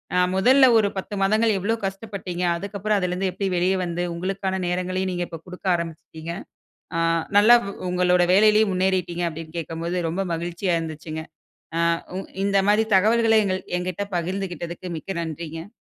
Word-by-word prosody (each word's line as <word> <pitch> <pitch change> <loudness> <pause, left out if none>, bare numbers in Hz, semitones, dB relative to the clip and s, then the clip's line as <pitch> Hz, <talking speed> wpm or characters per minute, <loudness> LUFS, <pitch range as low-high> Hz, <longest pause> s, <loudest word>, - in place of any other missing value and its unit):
அ - - +3 0.2
முதல்ல 260 +7 +6
ஒரு 215 -2 +3
10 195 +2 -4
மாதங்கள் 215 +2 +3
எவ்ளோ 225 +4 0
கஷ்டப்பட்டீங்க, 195 -3 -5
அதுக்கப்புறம் 200 +3 -1
அதுலருந்து 180 +1 -1
எப்டி 195 +1 -2
வெளிய 180 +2 +2
வந்து 175 0 -2
உங்களுக்கான 190 +2 -2
நேரங்களையும் 185 +1 -1
இப்ப 165 - -8
குடுக்க 180 +1 -11
ஆரம்பிச்சிட்டீங்க. 165 -1 -6 0.6
அ 165 - +1 0.4
நல்ல 215 +3 +7 0.4
உங்களோட 180 0 +3
வேலையிலயும் 215 +1 +5
முன்னேறிட்டீங்க 180 -2 0
அப்டின்னு 160 0 -9
கேட்கும்போது, 165 +2 -4
ரொம்ப 185 +4 -2
மகிழ்ச்சியா 170 +2 -1
இருந்துச்சுங்க. 160 0 -6 0.5
அ - - +1 0.4
உ - - -2 0.3
இந்த 200 0 +2
மாரி 210 +2 +4
தகவல்கள 225 +3 +4
எங்க 190 - 0 0.3
எங்கட்ட 185 +2 -3
பகிர்ந்துகிட்டதுக்கு 175 0 -4
மிக்க 185 +4 -5
நன்றிங்க. 165 +4 -6
185 Hz, 140 wpm, -23 LUFS, 170-200 Hz, 0.6 s, நல்ல